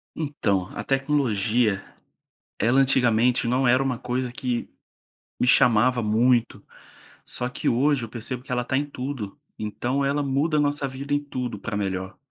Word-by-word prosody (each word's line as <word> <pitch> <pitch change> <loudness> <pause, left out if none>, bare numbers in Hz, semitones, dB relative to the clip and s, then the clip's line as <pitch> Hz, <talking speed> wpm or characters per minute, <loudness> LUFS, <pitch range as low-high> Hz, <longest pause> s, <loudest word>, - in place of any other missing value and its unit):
Então, 105 - -1
a - - -4
tecnologia, 120 -7 +1 0.8
ela 120 +5 +3
antigamente 125 -2 +3
não 125 +1 +2
era 130 +2 +4
uma 130 -2 -1
coisa 125 0 -2
que 125 -1 -3 0.7
me - - +1
chamava 125 0 +4
muito. 115 +2 +2 0.6
Só 125 - -3
que 125 - -3
hoje, 135 +2 +2
eu 115 - -7
percebo 120 +2 -5
que 135 - -17
ela 125 -1 0
tá 130 - -1
em 145 - +1
tudo. 130 -5 -6 0.2
Então 120 +6 -2
ela 140 +1 +1
muda 140 +3 +1
a - - +4
nossa 145 -1 0
vida 140 +2 -3
em 145 - +2
tudo, 125 -4 -4
pra 115 -3 -4
melhor. 95 -1 -3
125 Hz, 160 wpm, -24 LUFS, 115-135 Hz, 0.8 s, era